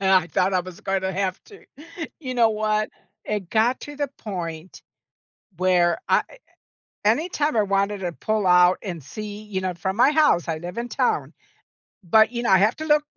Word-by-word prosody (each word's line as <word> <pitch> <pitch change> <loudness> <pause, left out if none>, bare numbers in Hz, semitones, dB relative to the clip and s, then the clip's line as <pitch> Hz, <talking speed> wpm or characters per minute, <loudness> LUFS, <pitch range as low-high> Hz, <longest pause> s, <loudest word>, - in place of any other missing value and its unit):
I 190 -3 +4
thought 185 +5 +1
I 185 - +3
was 180 -1 -10
gonna 190 -1 -1
have 190 -1 -2
to. 410 -2 -16 0.6
You 255 -3 -5
know 230 -2 +4
what? 215 0 0 0.4
It 205 -4 -4
got 230 +3 +2
to 290 -1 -8
the 285 -2 -2
point 175 -5 -6 0.8
where 180 - +2
I - - +4
e - - -12 0.7
anytime 295 - +1
I 215 - +4
wanted 200 +1 0
to 175 -2 -3
pull 215 +2 -1
out 180 0 +5
and 175 -7 -6
see, 210 +8 -7
you 205 -3 -4
know, 185 -1 -2
from 190 +3 -3
my 255 +4 +5
house 300 - +3
I 160 -1 -1
live 175 +4 -8
in 240 - -3
town, - - 0 0.7
but, 220 +6 +4
you 240 0 -3
know, - - 0
I 190 -1 +6
have 210 +4 +3
to 315 - -5
look 300 -1 +3
200 Hz, 190 wpm, -23 LUFS, 180-230 Hz, 0.8 s, I